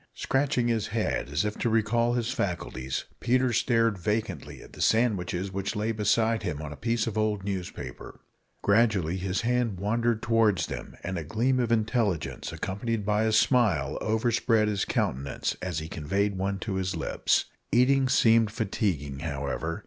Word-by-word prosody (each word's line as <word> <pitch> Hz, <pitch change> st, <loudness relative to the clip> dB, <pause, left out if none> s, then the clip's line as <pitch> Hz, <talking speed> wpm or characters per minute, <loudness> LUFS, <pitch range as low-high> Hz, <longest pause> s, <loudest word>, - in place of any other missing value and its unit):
Scratching 135 Hz, -3 st, +1 dB
his 110 Hz, -3 st, 0 dB
head, 110 Hz, -10 st, -1 dB
as 75 Hz, +6 st, 0 dB
if 105 Hz, -, -3 dB
to 120 Hz, -, +1 dB
recall 115 Hz, +2 st, +2 dB
his 120 Hz, 0 st, -1 dB
faculties, 70 Hz, -8 st, -3 dB
Peter 125 Hz, 0 st, +2 dB
stared 115 Hz, -3 st, +2 dB
vacantly 105 Hz, +4 st, -3 dB
at -, -, -16 dB
the -, -, -8 dB
sandwiches 100 Hz, -5 st, +1 dB
which 100 Hz, +3 st, -3 dB
lay 105 Hz, +2 st, 0 dB
beside 110 Hz, +1 st, +2 dB
him 75 Hz, -, -3 dB
on 75 Hz, -2 st, -6 dB
a -, -, -9 dB
piece 115 Hz, +5 st, 0 dB
of 110 Hz, -1 st, -2 dB
old 105 Hz, -2 st, 0 dB
newspaper. 90 Hz, -10 st, -6 dB, 0.4 s
Gradually 100 Hz, -5 st, +3 dB
his 95 Hz, +1 st, -1 dB
hand 120 Hz, -5 st, 0 dB
wandered 115 Hz, +3 st, 0 dB
towards 115 Hz, -4 st, +3 dB
them, -, -, -7 dB
and 90 Hz, 0 st, -3 dB
a -, -, -5 dB
gleam 120 Hz, -, +1 dB
of 120 Hz, -2 st, 0 dB
intelligence, 110 Hz, -, 0 dB
accompanied 105 Hz, +2 st, -3 dB
by 105 Hz, +1 st, +2 dB
a 110 Hz, -, +2 dB
smile, 115 Hz, 0 st, +2 dB
overspread 110 Hz, 0 st, +2 dB
his 100 Hz, -2 st, 0 dB
countenance 70 Hz, +1 st, -1 dB
as 90 Hz, -3 st, -3 dB
he 80 Hz, 0 st, -3 dB
conveyed 100 Hz, +7 st, -1 dB
one 95 Hz, +1 st, -1 dB
to 95 Hz, -1 st, -3 dB
his 95 Hz, -1 st, -1 dB
lips. -, -, +1 dB, 0.3 s
Eating 130 Hz, +2 st, +4 dB
seemed 115 Hz, -3 st, +4 dB
fatiguing, 95 Hz, -, -2 dB
however. 70 Hz, +6 st, -3 dB
105 Hz, 165 wpm, -27 LUFS, 95-115 Hz, 0.4 s, Eating